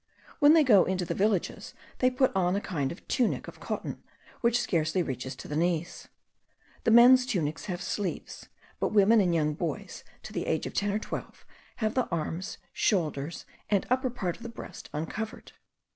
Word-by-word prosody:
When 290 Hz, +1 st, +7 dB
they 320 Hz, -, +6 dB
go 210 Hz, -9 st, +6 dB
into 185 Hz, -1 st, -1 dB
the -, -, -2 dB
villages 200 Hz, -2 st, -1 dB, 0.2 s
they 255 Hz, -, +4 dB
put 255 Hz, -2 st, +1 dB
on 180 Hz, -1 st, +2 dB
a -, -, +1 dB
kind 150 Hz, -10 st, -2 dB
of 170 Hz, -, -11 dB
tunic 245 Hz, -3 st, 0 dB
of -, -, -10 dB
cotton, -, -, -5 dB, 0.4 s
which 235 Hz, 0 st, +2 dB
scarcely 170 Hz, -4 st, +1 dB
reaches 130 Hz, -2 st, -5 dB
to -, -, -10 dB
the 150 Hz, -, -4 dB
knees. 170 Hz, 0 st, -1 dB, 0.8 s
The -, -, +4 dB
men's 245 Hz, +3 st, +8 dB
tunics 165 Hz, -, -2 dB
have 180 Hz, -2 st, -4 dB
sleeves; 195 Hz, 0 st, -4 dB, 0.3 s
but -, -, -1 dB
women, 215 Hz, +2 st, +6 dB
and 180 Hz, -3 st, +2 dB
young 150 Hz, -2 st, +1 dB
boys 155 Hz, -1 st, -5 dB, 0.2 s
to -, -, -9 dB
the -, -, -3 dB
age -, -, 0 dB
of -, -, -5 dB
ten 205 Hz, 0 st, 0 dB
or 205 Hz, -, 0 dB
twelve, 215 Hz, -, -7 dB, 0.3 s
have 215 Hz, -1 st, -1 dB
the 255 Hz, -2 st, +1 dB
arms, 165 Hz, +2 st, -3 dB, 0.2 s
shoulders, 160 Hz, -5 st, -1 dB, 0.2 s
and 200 Hz, -2 st, +2 dB
upper 255 Hz, 0 st, +2 dB
part 190 Hz, -8 st, -3 dB
of -, -, -21 dB
the 235 Hz, -, -6 dB
breast 230 Hz, -, -10 dB
uncovered. 215 Hz, +9 st, -5 dB
190 Hz, 185 wpm, -28 LUFS, 165-230 Hz, 0.8 s, men's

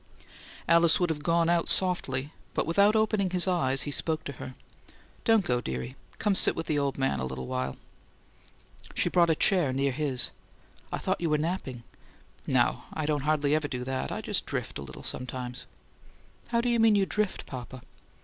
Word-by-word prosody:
Alice 170 Hz, +3 st, +5 dB
would 175 Hz, -2 st, +1 dB
have 150 Hz, -2 st, -4 dB
gone 165 Hz, +1 st, +2 dB
out 170 Hz, -1 st, +2 dB
softly, 150 Hz, -6 st, +2 dB, 0.2 s
but -, -, +1 dB
without 200 Hz, +6 st, +4 dB
opening 215 Hz, -3 st, +2 dB
his 180 Hz, 0 st, +2 dB
eyes, 135 Hz, -7 st, +1 dB
he 145 Hz, -, -4 dB
spoke 160 Hz, +2 st, -1 dB
to -, -, -5 dB
her: 130 Hz, -, -7 dB, 0.7 s
"Don't 225 Hz, -4 st, +4 dB
go, 125 Hz, -4 st, +1 dB
dearie. 65 Hz, -, -5 dB, 0.2 s
Come 210 Hz, -1 st, +1 dB
sit -, -, +2 dB
with 165 Hz, -, -3 dB
the 150 Hz, -2 st, 0 dB
old 140 Hz, -1 st, -1 dB
man 135 Hz, -, 0 dB
a -, -, -2 dB
little 65 Hz, 0 st, -4 dB
while." 65 Hz, +1 st, -3 dB, 1.2 s
She -, -, +1 dB
brought 170 Hz, -1 st, +4 dB
a 160 Hz, -, +4 dB
chair 175 Hz, -6 st, +3 dB
near 135 Hz, +1 st, +1 dB
his. 135 Hz, -2 st, -1 dB, 0.6 s
"I -, -, -1 dB
thought -, -, -2 dB
you 170 Hz, -, 0 dB
were 150 Hz, -, +3 dB
napping." 150 Hz, -7 st, -3 dB, 0.6 s
"No. -, -, +2 dB
I 155 Hz, -, -3 dB
don't 145 Hz, -2 st, -1 dB
hardly 150 Hz, -1 st, +2 dB
ever 155 Hz, -1 st, +1 dB
do 125 Hz, -3 st, -4 dB
that. 130 Hz, +1 st, -3 dB
I -, -, -3 dB
just -, -, -2 dB
drift -, -, -4 dB
a -, -, -6 dB
little 65 Hz, -1 st, -10 dB
sometimes." 125 Hz, 0 st, -4 dB, 0.8 s
"How 235 Hz, -1 st, +1 dB
do 245 Hz, -, 0 dB
you 235 Hz, -1 st, +2 dB
mean 225 Hz, -1 st, +5 dB
you 200 Hz, -1 st, +3 dB
drift, 210 Hz, 0 st, -2 dB
papa?" 125 Hz, -1 st, -8 dB
155 Hz, 190 wpm, -28 LUFS, 130-180 Hz, 1.2 s, Alice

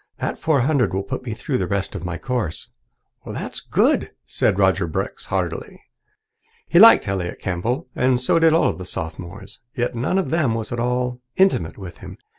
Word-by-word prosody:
That -, -, -3 dB
four 155 Hz, -5 st, +2 dB
hundred 130 Hz, -7 st, +1 dB
will 95 Hz, -, -1 dB
put 100 Hz, -, -5 dB
me 115 Hz, -4 st, -4 dB
through 130 Hz, +2 st, -2 dB
the -, -, -1 dB
rest 100 Hz, -1 st, -2 dB
of -, -, -6 dB
my 90 Hz, -1 st, -4 dB
course." 120 Hz, -10 st, -3 dB, 0.5 s
"That's -, -, -5 dB
good," -, -, +1 dB, 0.2 s
said 95 Hz, -, 0 dB
Roger 95 Hz, -2 st, +2 dB
Brooks 80 Hz, -, -4 dB
heartily. -, -, -3 dB, 0.9 s
He 170 Hz, -, +4 dB
liked 225 Hz, -, +8 dB
Elliott 95 Hz, -3 st, -2 dB
Campbell, 115 Hz, -, -2 dB
and 125 Hz, 0 st, +2 dB
so 130 Hz, +6 st, +2 dB
did 165 Hz, 0 st, +5 dB
all 165 Hz, -, +3 dB
the 90 Hz, -, -8 dB
Sophomores. 90 Hz, +3 st, -7 dB, 0.2 s
Yet 120 Hz, +1 st, -1 dB
none 125 Hz, +10 st, 0 dB
of 190 Hz, -, -1 dB
them 150 Hz, -9 st, +1 dB
was 110 Hz, -1 st, -4 dB
at 120 Hz, -, -3 dB
all 125 Hz, +1 st, -1 dB
intimate 140 Hz, -, +2 dB
with 95 Hz, -4 st, -9 dB
him. -, -, -10 dB
120 Hz, 185 wpm, -22 LUFS, 95-130 Hz, 0.9 s, liked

